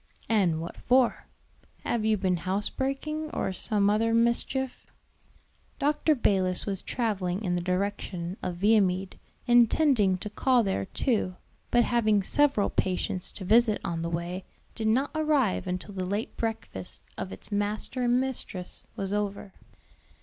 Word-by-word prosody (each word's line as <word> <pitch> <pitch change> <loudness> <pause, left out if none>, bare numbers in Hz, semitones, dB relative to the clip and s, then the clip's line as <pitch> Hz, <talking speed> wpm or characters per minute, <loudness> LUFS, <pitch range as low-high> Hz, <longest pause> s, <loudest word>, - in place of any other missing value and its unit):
and 190 -8 +2
what 165 +1 -6
for? 250 -1 +2 0.6
have 235 -2 -1
you 215 0 +2
been 185 -2 +1
house 190 +4 -1
breaking 305 +4 -3
or 190 - -1
some 205 +1 +1
other 225 +2 +2
mischief?" 235 +3 0 0.9
Dr. 300 +2 +2
Balis 190 -7 +1
was 195 -2 -3
traveling 200 -5 -2
in 175 -3 0
the 175 - -1
direction 185 -1 -2
of 180 - -3
Viamede, 190 -1 +2 0.3
intending 240 -4 +4
to 200 - -5
call 245 +3 +2
there 190 - -1
too, 210 - -1 0.3
but 240 - +4
having 215 -4 +2
several 275 -2 +2
patients 185 0 -1
to 190 - -8
visit 220 +2 +4
on 165 -1 -2
the 170 - -2
way, 175 +2 -3 0.3
did 220 -1 -2
not 255 +6 +2
arrive 295 -12 +1
until 180 +3 -4
the 185 -1 -3
late 200 +4 -3
breakfast 220 - -4
of 95 - -5
its 95 - -8
master 205 +5 0
and 245 0 +3
mistress 235 -8 -2
was 195 0 -3
over. 205 -1 -3
205 Hz, 145 wpm, -28 LUFS, 185-240 Hz, 0.9 s, intending